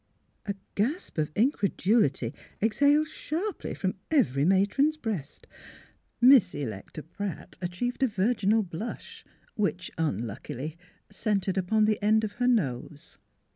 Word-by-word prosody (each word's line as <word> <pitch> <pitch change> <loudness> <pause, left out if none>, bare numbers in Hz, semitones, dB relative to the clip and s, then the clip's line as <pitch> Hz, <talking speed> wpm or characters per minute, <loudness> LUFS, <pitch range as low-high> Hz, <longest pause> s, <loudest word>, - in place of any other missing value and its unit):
A 200 - -1 0.2
gasp 245 - -1
of 150 -1 0
incredulity 200 - +2 0.3
exhaled 285 +8 +3
sharply 335 +6 -4
from 190 -1 -1 0.2
every 185 - +2
matron's 205 - +3
breast. 205 - -5
• - - -20 0.3
Miss 250 -9 +7
Electa 120 +3 -6
Pratt 195 +3 -6
achieved 185 +9 -3
a 265 - +5
virginal 215 0 +2
blush, 185 +5 -7 0.3
which, 195 -4 -2
unluckily, 130 +2 -3 0.4
centred 195 -2 -1
upon 210 +3 +2
the 215 0 +1
end 220 +1 +4
of 215 - -2
her 245 - +3
nose. 150 - -1
205 Hz, 120 wpm, -28 LUFS, 165-240 Hz, 0.4 s, Miss